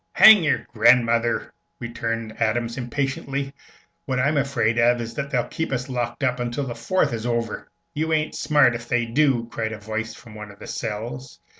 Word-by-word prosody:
"Hang 215 Hz, -5 st, +8 dB
your 150 Hz, -, +1 dB
grandmother!" 115 Hz, 0 st, +3 dB, 0.3 s
returned 115 Hz, -2 st, -4 dB
Adams, 115 Hz, +1 st, 0 dB
impatiently. 135 Hz, +2 st, -3 dB, 0.5 s
"What 130 Hz, -2 st, -1 dB
I'm 140 Hz, +4 st, +2 dB
afraid 120 Hz, -5 st, +1 dB
of 120 Hz, +1 st, +4 dB
is 115 Hz, 0 st, -5 dB
that 140 Hz, +3 st, -4 dB
they'll 125 Hz, -3 st, +1 dB
keep 160 Hz, -, -4 dB
us 125 Hz, 0 st, -2 dB
locked 120 Hz, +1 st, -3 dB
up 125 Hz, -1 st, +1 dB
until 120 Hz, +3 st, -2 dB
the 120 Hz, -, -4 dB
Fourth 120 Hz, +6 st, 0 dB
is 115 Hz, +1 st, -3 dB
over." 115 Hz, -2 st, -2 dB, 0.3 s
"You 160 Hz, +2 st, -2 dB
ain't 155 Hz, -1 st, 0 dB
smart 145 Hz, -4 st, +3 dB
ef 120 Hz, 0 st, -6 dB
they 120 Hz, -1 st, +1 dB
do!" 120 Hz, -1 st, +1 dB
cried 110 Hz, -1 st, -3 dB
a -, -, -6 dB
voice 110 Hz, +2 st, -4 dB
from 115 Hz, -3 st, -14 dB
one 105 Hz, -1 st, -9 dB
of 100 Hz, -, -14 dB
the -, -, -11 dB
cells. 120 Hz, +5 st, -5 dB
120 Hz, 185 wpm, -23 LUFS, 115-135 Hz, 0.5 s, Hang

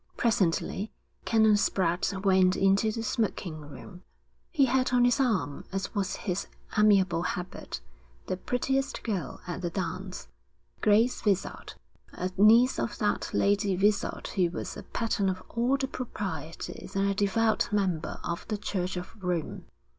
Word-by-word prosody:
Presently 205 Hz, -1 st, +1 dB, 0.3 s
Canon 220 Hz, -1 st, +5 dB
Spratte 190 Hz, 0 st, 0 dB
went 185 Hz, -1 st, +5 dB
into 195 Hz, +3 st, +3 dB
the 225 Hz, +1 st, -4 dB
smoking 205 Hz, -7 st, -2 dB
room. 165 Hz, +5 st, -11 dB, 0.5 s
He 285 Hz, -6 st, +3 dB
had 255 Hz, 0 st, +1 dB
on 245 Hz, -1 st, +4 dB
his 245 Hz, +3 st, +3 dB
arm, 215 Hz, -, 0 dB
as 195 Hz, 0 st, -3 dB
was 200 Hz, -3 st, -1 dB
his 180 Hz, 0 st, -3 dB, 0.3 s
amiable 195 Hz, -5 st, +4 dB
habit, 180 Hz, 0 st, -4 dB, 0.4 s
the -, -, -2 dB
prettiest 265 Hz, +7 st, -1 dB
girl 190 Hz, -, -3 dB
at 175 Hz, +1 st, -5 dB
the 175 Hz, -, -1 dB
dance, 185 Hz, -, -4 dB, 0.5 s
Grace 220 Hz, +4 st, +3 dB
Vizard, 200 Hz, -3 st, -1 dB, 0.4 s
a 185 Hz, +1 st, -3 dB
niece 230 Hz, +6 st, +6 dB
of -, -, -2 dB
that -, -, 0 dB
Lady 200 Hz, -1 st, +2 dB
Vizard 205 Hz, +2 st, +1 dB
who 180 Hz, -3 st, +1 dB
was 175 Hz, -, -5 dB
a -, -, -7 dB
pattern 220 Hz, -4 st, -1 dB
of 185 Hz, 0 st, -4 dB
all 245 Hz, +4 st, +2 dB
the 270 Hz, -1 st, -1 dB
proprieties 190 Hz, -, -6 dB
and 195 Hz, 0 st, +2 dB
a 200 Hz, -, +2 dB
devout 220 Hz, +4 st, +2 dB
member 190 Hz, -6 st, -1 dB
of 170 Hz, -, -4 dB
the 215 Hz, -, -2 dB
Church 185 Hz, -2 st, -2 dB
of 180 Hz, -, -6 dB
Rome. 175 Hz, -3 st, -2 dB
195 Hz, 145 wpm, -28 LUFS, 180-225 Hz, 0.5 s, niece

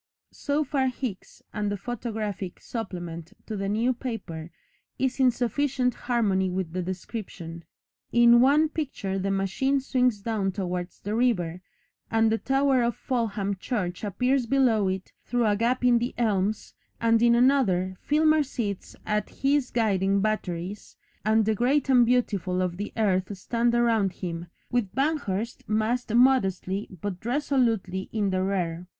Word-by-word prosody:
So 290 Hz, +1 st, 0 dB
far 270 Hz, -2 st, 0 dB
Hicks, 250 Hz, -6 st, -5 dB
and 210 Hz, -1 st, -1 dB
the 205 Hz, -, -2 dB
photographic 210 Hz, -4 st, -4 dB
supplement 175 Hz, -5 st, -6 dB
to 220 Hz, -, -5 dB
the 195 Hz, -1 st, -2 dB
New 230 Hz, +5 st, +1 dB
Paper 195 Hz, -10 st, -6 dB, 0.5 s
is 260 Hz, 0 st, -1 dB
in 260 Hz, -1 st, +6 dB
sufficient 250 Hz, +1 st, 0 dB
harmony 205 Hz, -6 st, 0 dB
with 180 Hz, -2 st, -3 dB
the 185 Hz, -, -1 dB
description. 175 Hz, -2 st, -6 dB, 0.5 s
In 235 Hz, 0 st, +6 dB
one 290 Hz, +4 st, +5 dB
picture 265 Hz, -11 st, -3 dB
the 195 Hz, +1 st, -1 dB
machine 195 Hz, +9 st, +1 dB
swings 250 Hz, -4 st, +1 dB
down 200 Hz, -3 st, -1 dB
towards 180 Hz, -2 st, -4 dB
the 205 Hz, -, -3 dB
river, 185 Hz, -8 st, +1 dB, 0.5 s
and 225 Hz, -1 st, +3 dB
the 225 Hz, -, +1 dB
tower 270 Hz, -1 st, +2 dB
of 235 Hz, 0 st, 0 dB
Fulham 210 Hz, -6 st, -1 dB
church 185 Hz, -4 st, -3 dB
appears 250 Hz, +5 st, +1 dB
below 240 Hz, -6 st, +3 dB
it 190 Hz, 0 st, -3 dB
through 245 Hz, -1 st, 0 dB
a 210 Hz, -1 st, +3 dB
gap 245 Hz, +4 st, 0 dB
in 240 Hz, -1 st, +5 dB
the 240 Hz, +1 st, -3 dB
elms, 210 Hz, -2 st, 0 dB, 0.3 s
and 230 Hz, 0 st, +3 dB
in 235 Hz, 0 st, +5 dB
another, 230 Hz, -8 st, +3 dB
Filmer 310 Hz, +1 st, +3 dB
sits 230 Hz, -8 st, -4 dB
at 210 Hz, -1 st, -1 dB
his 275 Hz, -1 st, +1 dB
guiding 200 Hz, -4 st, +1 dB
batteries, 195 Hz, -2 st, -3 dB, 0.3 s
and 220 Hz, 0 st, +3 dB
the 220 Hz, -, +2 dB
great 265 Hz, +5 st, +1 dB
and 245 Hz, -3 st, +6 dB
beautiful 200 Hz, -7 st, +1 dB
of 175 Hz, -1 st, -2 dB
the 205 Hz, +1 st, -4 dB
earth 195 Hz, -2 st, +1 dB
stand 235 Hz, +4 st, 0 dB
around 225 Hz, -5 st, +2 dB
him, 170 Hz, -2 st, -5 dB, 0.2 s
with 240 Hz, -6 st, -1 dB
Banghurst 255 Hz, -7 st, -1 dB
massed 220 Hz, +3 st, 0 dB
modestly 210 Hz, -6 st, +2 dB
but 195 Hz, -3 st, -4 dB
resolutely 235 Hz, -7 st, 0 dB
in 205 Hz, -3 st, 0 dB
the 185 Hz, 0 st, 0 dB
rear. 180 Hz, -3 st, -2 dB
220 Hz, 150 wpm, -26 LUFS, 190-250 Hz, 0.5 s, in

